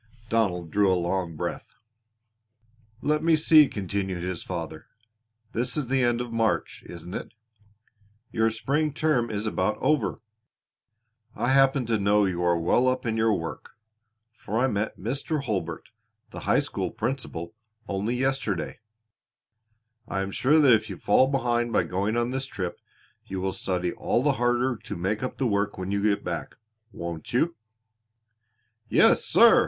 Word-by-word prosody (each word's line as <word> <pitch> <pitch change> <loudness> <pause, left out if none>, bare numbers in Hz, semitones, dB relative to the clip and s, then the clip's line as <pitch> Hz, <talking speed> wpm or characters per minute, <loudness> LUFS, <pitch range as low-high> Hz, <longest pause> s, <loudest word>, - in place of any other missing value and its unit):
Donald 90 -7 0
drew 100 -2 +3
a 90 - +3
long 85 -1 -1
breath. - - -5 1.3
"Let 150 +1 +1
me 165 -1 +5
see," 155 -1 +6
continued 95 -3 -3
his 90 -2 -3
father, 80 -3 -6 0.6
"this 120 +6 -1
is 140 -5 -2
the 135 0 +2
end 120 -1 +2
of 120 -1 -6
March, 115 -1 0
isn't 85 +1 -9
it? 115 - -6 1.0
Your 110 0 +2
spring 140 +7 -1
term 150 -7 +1
is 105 0 -3
about 105 0 0
over. 150 -8 +1 1.2
I 120 - 0
happen 135 -1 +4
to 115 -2 0
know 100 +1 +3
you 90 -2 -1
are 85 -1 +3
well 90 +10 +2
up 130 0 0
in 115 -1 0
your 110 -1 +3
work, 80 -4 -7 0.5
for 110 -1 -5
I 125 - +3
met 110 -4 -1
Mr. 140 - -2
Hurlbert, 85 - -3 0.4
the - - -7
high - - +5
school - - -3
principal, 120 -10 -4 0.3
only 100 +5 -1
yesterday. 130 -7 -1 1.3
I 95 - -2
am 95 0 -3
sure 140 +9 +3
that 140 -5 +6
if 110 0 +2
you - - -6
fall 130 - +4
behind 120 -3 0
by - - +3
going 100 +5 -1
on 120 +1 0
this 135 +1 -2
trip 90 -8 -5 0.5
you 95 - -4
will 95 0 -1
study 90 -2 -2
all 120 - 0
the 145 - +4
harder 120 +1 +2
to - - -7
make 95 +5 -1
up 130 - -4
the 135 - 0
work 100 -2 0
when 95 +1 -4
you 100 0 0
get 100 -1 +1
back, - - -4 0.4
won't 85 -3 -6
you?" 165 +7 +2 1.3
"Yes, - - +5
sir!" - - +6
110 Hz, 160 wpm, -26 LUFS, 95-130 Hz, 1.3 s, see